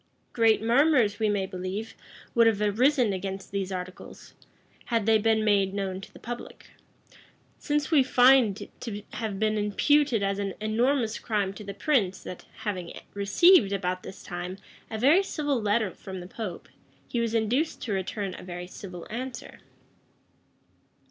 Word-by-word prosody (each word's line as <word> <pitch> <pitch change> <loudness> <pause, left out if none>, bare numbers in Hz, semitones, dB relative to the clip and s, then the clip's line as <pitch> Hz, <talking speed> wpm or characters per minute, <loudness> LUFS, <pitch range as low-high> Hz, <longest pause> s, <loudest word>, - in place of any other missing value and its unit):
Great 225 -2 +3
murmurs, 240 -4 +3
we 215 -1 +2
may 200 -2 0
believe, 190 +4 -5 0.4
would 230 -1 +5
have 220 -3 +2
arisen 235 +2 +3
against 190 +1 -5
these 195 -1 -2
articles, 185 0 -8 0.5
had 230 -3 0
they 220 0 +4
been 220 0 +2
made 200 -2 +2
known 190 -1 -3
to - - -11
the - - -14
public; 240 +1 -8 0.9
since 295 +1 -1
we 300 -4 +6
find 250 -5 +5
it - - -17
to 210 -4 -5
have 220 -4 -3
been 215 +1 +1
imputed 235 +3 +2
as 195 0 0
an 200 -1 -3
enormous 230 +2 +1
crime 205 -3 -1
to 210 - -9
the 200 -1 -7
prince 205 -6 +1
that, 180 - -8 0.2
having 190 -6 -4 0.2
received, 200 - +5
about 185 -2 -1
this 190 - -10
time, 175 +1 -5 0.3
a 220 - -4
very 285 - +5
civil 290 - -1
letter 210 -1 +1
from 190 -1 -8
the 175 - -8
pope, 190 -3 -6 0.4
he 240 - -2
was 230 -1 0
induced 240 +8 0
to 215 - -2
return 195 0 -3
a - - -10
very 180 -1 -6
civil 180 -1 -9
answer. 250 +2 -6
210 Hz, 160 wpm, -27 LUFS, 195-240 Hz, 0.9 s, we